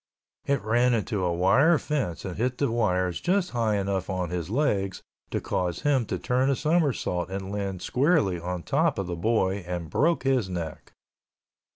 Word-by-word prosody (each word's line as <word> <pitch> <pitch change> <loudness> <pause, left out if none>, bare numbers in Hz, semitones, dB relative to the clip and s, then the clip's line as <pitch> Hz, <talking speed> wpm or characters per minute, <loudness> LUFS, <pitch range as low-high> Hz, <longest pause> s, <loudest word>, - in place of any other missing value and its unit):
It 140 -2 +1
ran 120 +3 +3
into 105 -3 -1
a 90 - +1
wire 100 - +4
fence 135 - -3
and 90 -2 -4
hit 125 +3 -1
the 140 -5 0
wires 90 -6 0
just 180 0 +1
high 115 -3 +1
enough 95 -1 -1
on 90 -3 -2
his 90 -1 -3
legs 105 -7 0 0.3
to - - -1
cause 90 -2 -2
him 135 -6 +2
to - - -2
turn 130 +2 +1
a 140 - +2
somersault 145 - 0
and 95 0 -5
land 100 -3 -3
squarely 125 - +2
on 90 0 -4
top - - +1
of 100 - -2
the 90 -1 -4
boy 95 +1 +1
and 90 -4 -5
broke 165 - +2
his 130 -7 +1
neck. 85 -4 -6
100 Hz, 180 wpm, -26 LUFS, 90-130 Hz, 0.3 s, wire